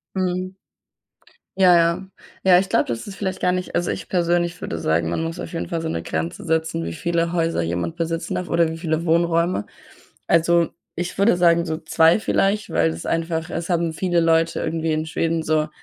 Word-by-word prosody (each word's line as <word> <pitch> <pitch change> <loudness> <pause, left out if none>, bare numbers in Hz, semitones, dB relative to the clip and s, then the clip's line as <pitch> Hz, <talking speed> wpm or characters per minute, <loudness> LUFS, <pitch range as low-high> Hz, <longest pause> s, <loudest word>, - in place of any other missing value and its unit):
Mhm. 185 0 -2 1.0
Ja, 180 -2 +6
ja. 170 +3 +1 0.3
Ja, 185 -2 +6
ich 190 +1 0
glaube, - - +2
das 115 - -4
ist 200 - -7
vielleicht 190 -1 -4
gar 180 - +2
nicht 185 0 -3
also, 175 - 0
ich - - -7
persönlich 175 0 0
würde 85 - -4
sagen, 80 +1 0
man 85 - -1
muss 165 +2 -4
auf - - -7
jeden 165 - -4
Fall 165 -1 -2
so 160 - -3
'ne 85 - -3
Grenze 80 +1 -4
setzen, 160 - -1
wie 85 - -4
viele 170 - -1
Häuser 165 - 0
jemand 85 0 -2
besitzen 165 0 -3
darf 180 - -3
oder 170 -1 +2
wie 160 - -6
viele 165 -1 -1
Wohnräume. 170 - +2 0.6
Also, 170 0 +3 0.3
ich 175 +1 -4
würde 200 -2 +4
sagen, 170 -1 +4
so 160 - -2
2 165 +2 +3
vielleicht, 200 -1 0
weil 80 -1 +2
das 80 +1 -7
einfach 165 -1 -2
es 170 +2 -4
haben 170 -2 +1
viele 175 +1 0
Leute 165 0 +2
irgendwie 165 -1 -1
in 155 0 -1
Schweden 165 0 -1
so 155 -1 +1
165 Hz, 200 wpm, -22 LUFS, 160-175 Hz, 1.0 s, Ja